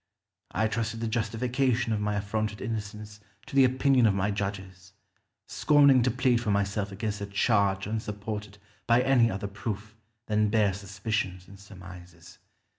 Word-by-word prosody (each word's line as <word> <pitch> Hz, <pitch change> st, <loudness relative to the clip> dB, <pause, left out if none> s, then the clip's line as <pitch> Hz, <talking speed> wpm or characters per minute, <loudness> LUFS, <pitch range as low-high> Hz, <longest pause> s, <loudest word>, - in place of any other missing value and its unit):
I 110 Hz, +3 st, 0 dB
trusted 115 Hz, 0 st, -3 dB
the 115 Hz, -, -2 dB
justification 120 Hz, +2 st, 0 dB
of 105 Hz, -, -1 dB
my 105 Hz, 0 st, -1 dB
affronted 105 Hz, +1 st, -2 dB
innocence 105 Hz, -1 st, -6 dB, 0.3 s
to -, -, -9 dB
the 135 Hz, -1 st, +7 dB
opinion 130 Hz, -1 st, +3 dB
of 100 Hz, -, +2 dB
my 100 Hz, +1 st, 0 dB
judges, 95 Hz, -2 st, -5 dB, 0.5 s
scorning 140 Hz, -3 st, +4 dB
to 125 Hz, -, +2 dB
plead 125 Hz, -1 st, +1 dB
for 115 Hz, -, -3 dB
myself 100 Hz, 0 st, 0 dB
against 105 Hz, +1 st, -4 dB
a 100 Hz, -, -4 dB
charge 100 Hz, -1 st, +1 dB
unsupported 105 Hz, -1 st, -5 dB, 0.3 s
by 120 Hz, +1 st, +4 dB
any 130 Hz, -3 st, +4 dB
other 100 Hz, 0 st, -4 dB
proof 105 Hz, +1 st, -6 dB, 0.3 s
than 105 Hz, -1 st, +1 dB
bare 105 Hz, -3 st, +2 dB
suspicions 100 Hz, -1 st, -4 dB
and 100 Hz, 0 st, -14 dB
surmises. 90 Hz, -3 st, -13 dB
105 Hz, 150 wpm, -28 LUFS, 100-115 Hz, 0.5 s, the